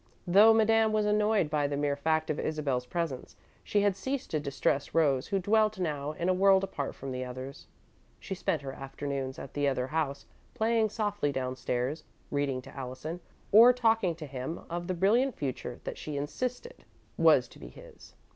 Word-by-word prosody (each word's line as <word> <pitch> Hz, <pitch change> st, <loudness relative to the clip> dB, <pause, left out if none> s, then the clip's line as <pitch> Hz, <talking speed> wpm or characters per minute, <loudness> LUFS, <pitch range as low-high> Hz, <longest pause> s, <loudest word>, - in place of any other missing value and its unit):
Though 200 Hz, +5 st, +7 dB
Madame 225 Hz, 0 st, +4 dB
was 215 Hz, -1 st, +2 dB
annoyed 210 Hz, -3 st, +2 dB
by 145 Hz, -2 st, +1 dB
the 140 Hz, 0 st, -3 dB
mere 145 Hz, -1 st, 0 dB
fact 155 Hz, +2 st, 0 dB
of 150 Hz, -, -3 dB
Isabel's 140 Hz, -5 st, -2 dB
presence, 165 Hz, -7 st, -4 dB, 0.3 s
she 205 Hz, -, +1 dB
had 200 Hz, -2 st, +2 dB
ceased 265 Hz, +7 st, -4 dB
to 155 Hz, -, 0 dB
distress 140 Hz, 0 st, -1 dB
Rose, 140 Hz, -5 st, +2 dB
who 200 Hz, -, 0 dB
dwelt 215 Hz, +2 st, +2 dB
now 150 Hz, -4 st, -2 dB
in 170 Hz, +3 st, -3 dB
a 185 Hz, -, +4 dB
world 195 Hz, +1 st, +4 dB
apart 145 Hz, -8 st, -4 dB
from 135 Hz, 0 st, -7 dB
the 130 Hz, 0 st, -3 dB
others. 130 Hz, +2 st, -8 dB, 0.5 s
She -, -, -6 dB
spent 160 Hz, -5 st, -2 dB
her 135 Hz, -1 st, -5 dB
afternoons 135 Hz, -1 st, -5 dB
at 135 Hz, -, -9 dB
the 145 Hz, -1 st, 0 dB
other 130 Hz, -2 st, 0 dB
house, 140 Hz, -1 st, -2 dB, 0.3 s
playing 220 Hz, 0 st, +2 dB
softly 205 Hz, -8 st, -1 dB
downstairs, 130 Hz, +2 st, -2 dB, 0.3 s
reading 140 Hz, -3 st, -1 dB
to -, -, -13 dB
Allison, 135 Hz, +6 st, -6 dB, 0.3 s
or 230 Hz, +4 st, +9 dB
talking 225 Hz, -7 st, +2 dB
to 155 Hz, -, -8 dB
him 135 Hz, +3 st, -5 dB
of 175 Hz, 0 st, -3 dB
the 185 Hz, -, -1 dB
brilliant 230 Hz, +8 st, +2 dB
future 130 Hz, -3 st, -4 dB
that -, -, -6 dB
she 150 Hz, -2 st, -5 dB
insisted 250 Hz, -, -4 dB, 0.3 s
was -, -, +5 dB
to -, -, -16 dB
be -, -, -9 dB
his. -, -, -15 dB
155 Hz, 185 wpm, -29 LUFS, 140-205 Hz, 0.5 s, or